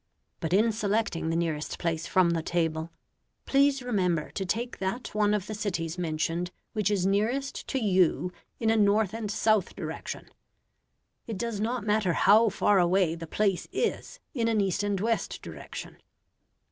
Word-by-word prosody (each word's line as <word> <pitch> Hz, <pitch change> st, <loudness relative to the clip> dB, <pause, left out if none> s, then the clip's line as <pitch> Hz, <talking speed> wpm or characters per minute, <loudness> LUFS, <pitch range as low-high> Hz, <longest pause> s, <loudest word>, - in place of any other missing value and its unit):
But 160 Hz, -, -3 dB
in 215 Hz, +5 st, +4 dB
selecting 210 Hz, -6 st, -1 dB
the 165 Hz, -, 0 dB
nearest 160 Hz, -3 st, -2 dB
place 165 Hz, -1 st, -2 dB
from 185 Hz, -2 st, +3 dB
the 165 Hz, -1 st, 0 dB
table, 160 Hz, -1 st, -1 dB, 0.6 s
please 275 Hz, -1 st, +3 dB
remember 180 Hz, -10 st, 0 dB
to 190 Hz, -, -4 dB
take 235 Hz, +7 st, -2 dB
that 195 Hz, +7 st, -3 dB
one 210 Hz, -1 st, +2 dB
of 210 Hz, -3 st, 0 dB
the 215 Hz, -, -5 dB
cities 180 Hz, -5 st, -3 dB
mentioned 165 Hz, +1 st, -1 dB, 0.2 s
which 210 Hz, -3 st, +1 dB
is 195 Hz, -3 st, +1 dB
nearest 225 Hz, +8 st, 0 dB
to 270 Hz, -, -1 dB
you 185 Hz, -5 st, +2 dB, 0.3 s
in 225 Hz, -1 st, +2 dB
a -, -, +3 dB
north 205 Hz, -1 st, +3 dB
and 225 Hz, -2 st, -4 dB
south 215 Hz, -2 st, +1 dB
direction. -, -, -6 dB, 1.0 s
It 225 Hz, -4 st, -4 dB
does 230 Hz, -1 st, -3 dB
not 230 Hz, +1 st, -1 dB
matter 210 Hz, -4 st, +2 dB
how 215 Hz, +6 st, +5 dB
far 200 Hz, 0 st, +3 dB
away 180 Hz, -1 st, +3 dB
the 165 Hz, 0 st, -7 dB
place 195 Hz, +1 st, 0 dB
is 485 Hz, +1 st, -2 dB
in 235 Hz, -5 st, 0 dB
an 225 Hz, -2 st, +2 dB
east 195 Hz, -1 st, +1 dB
and 205 Hz, -1 st, 0 dB
west 225 Hz, +3 st, -1 dB
direction. -, -, -8 dB
200 Hz, 165 wpm, -28 LUFS, 175-220 Hz, 1.0 s, how